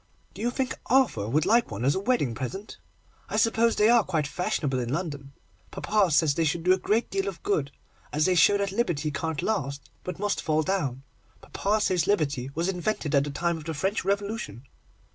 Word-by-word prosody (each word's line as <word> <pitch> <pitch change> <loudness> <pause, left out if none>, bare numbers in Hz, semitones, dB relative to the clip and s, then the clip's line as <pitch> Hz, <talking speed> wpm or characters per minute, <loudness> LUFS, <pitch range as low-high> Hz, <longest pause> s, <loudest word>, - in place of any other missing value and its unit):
Do - - -9
you 235 - +1
think 260 +1 -2
Arthur 240 - +2
would 150 +6 +2
like 230 +4 +3
one 115 +6 -2
for 140 - +2
a - - -6
wedding 200 - +1
present? 190 - -6 0.5
I - - -2
suppose 230 0 +3
they 210 - +4
are 235 -1 +5
quite 160 -6 -1
fashionable 145 -3 -1
in 120 -1 -3
London. 145 -4 -4 0.4
Papa 205 -3 +1
says 155 -1 +3
they 165 - 0
should 160 +2 0
do 180 +1 +5
a 190 - 0
great 220 +5 0
deal 195 0 -1
of 190 -4 -6
good, 145 -9 0 0.4
as 155 +1 +1
they 185 - +3
show 180 +4 +5
that 200 -1 -1
Liberty 175 -9 -1
can't 155 +1 -3
last, 140 -10 -2
but 180 - -5
must 205 +1 -1
fall 155 0 +1
down. 145 -8 -2 0.4
Papa 210 +2 -1
says 180 -5 +1
Liberty 145 -10 0
was 165 +3 0
invented 180 -4 -2
at 140 -1 +4
the - - -4
time 170 +4 -1
of 155 - -11
the 160 -1 -4
French 195 +9 -1
Revolution. 200 - -2
175 Hz, 205 wpm, -27 LUFS, 145-205 Hz, 0.5 s, are